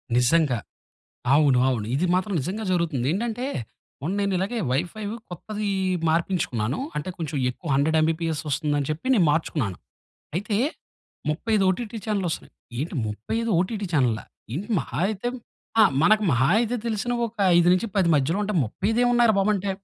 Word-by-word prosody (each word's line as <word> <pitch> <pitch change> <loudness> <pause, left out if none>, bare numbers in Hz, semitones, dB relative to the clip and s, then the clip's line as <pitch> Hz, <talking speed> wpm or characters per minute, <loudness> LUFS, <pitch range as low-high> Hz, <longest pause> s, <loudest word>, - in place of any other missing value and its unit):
నిజంగా. 125 +1 +3 0.8
అవును. 145 -4 +4
అవును. 115 -5 -1
ఇది 175 +6 +1
మాత్రం 190 +2 0
నిజంగా 200 +9 -3
జరుగుతుంది. 160 -8 0
ఏంటంటే 235 +5 -2 0.6
మొన్న 175 +7 -1
నేనిలాగే 200 +3 0
వైఫై 175 +10 -2 0.3
కొత్తది 210 +4 -4 0.4
మార్పించుకున్నాను. 160 - 0 0.2
అంటే 150 - -3
కొంచెం 160 -2 -3
ఎక్కువ 150 +6 -9
100 155 +3 +2
ఎంబీపీఎస్ 160 0 0
వస్తుందని 145 0 0
చెప్పి 155 +11 -4
నేను 180 -9 +4
మార్చుకున్నాను. 135 - -1 0.6
అయితే 205 +3 -1 0.7
35 205 +6 +1
ఓటీటీ 225 +3 -2
ఛానల్‌లు 200 -4 0
వస్తున్నాయి. - - -6 0.3
ఏంటి? 160 +3 -3
35 220 - -2
ఓటీటీ 200 +2 -1
చానెళ్ళా? 120 -7 +2 0.3
ఏంటి? 185 - -4
మహా 120 - -4
అయితే 215 +3 -3 0.5
ఆ! - - +9 0.2
మనకు 215 +3 +5
మహా 125 +2 +3
అయితే 240 +1 0
తెలిసిన 225 +1 -1
ఒక 230 0 -8 0.2
5 175 - +4
నుంచి 205 +5 0
10 190 -3 +3
మధ్యలో 150 +7 +1
అంటే 210 - -2
35 205 - -1
ఏమున్నాయిరా 240 -2 +4
బాబు 195 +2 +2
అంటే 195 +1 -2
175 Hz, 150 wpm, -25 LUFS, 145-215 Hz, 0.8 s, ఆ